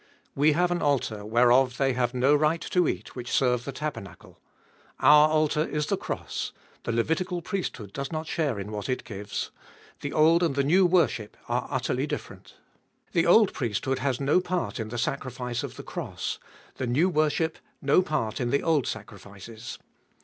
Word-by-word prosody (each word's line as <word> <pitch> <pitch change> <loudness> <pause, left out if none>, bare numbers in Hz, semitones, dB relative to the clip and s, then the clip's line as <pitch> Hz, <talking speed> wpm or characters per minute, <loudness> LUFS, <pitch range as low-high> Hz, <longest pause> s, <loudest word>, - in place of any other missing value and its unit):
We 150 +2 +4
have 175 +3 +2
an 175 - 0
altar, 125 -7 0
whereof 125 +3 +4
they 135 -1 +2
have 125 0 -1
no 130 +3 +4
right 155 +3 +2
to 180 0 +1
eat, 95 +4 -4
which 125 -1 -6
serve 125 -2 +2
the 140 - -4
tabernacle. 135 -8 -7 0.6
Our 150 +1 +7
altar 155 0 +2
is 150 -2 -2
the - - 0
cross: - - -4 0.3
the - - -1
Levitical 165 - -1
priesthood 130 - -4
does 140 0 -4
not 155 0 -3
share 155 -7 -1
in 100 +2 -6
what 105 +3 -5
it 130 - -1
gives; 105 -2 -5 0.5
the 145 - -4
old 160 +2 +4
and 165 -6 +1
the 140 - +2
new 180 +6 +4
worship 170 - +1
are - - -1
utterly - - -1
different - - -7 0.6
The 170 0 +2
old 210 +3 +6
priesthood 130 +1 -1
has 130 -1 -1
no 145 +5 +3
part 180 -6 -2
in 110 -1 -4
the 120 - -5
sacrifice 125 -1 -3
of - - -6
the - - -8
cross: - - -5 0.4
the 130 - -2
new 140 +9 +3
worship 155 -1 +1 0.2
no 145 +4 +4
part 150 -10 -2
in 120 - 0
the 140 - +1
old 155 -6 +2
sacrifices. 105 +2 -8
140 Hz, 180 wpm, -27 LUFS, 120-155 Hz, 0.6 s, Our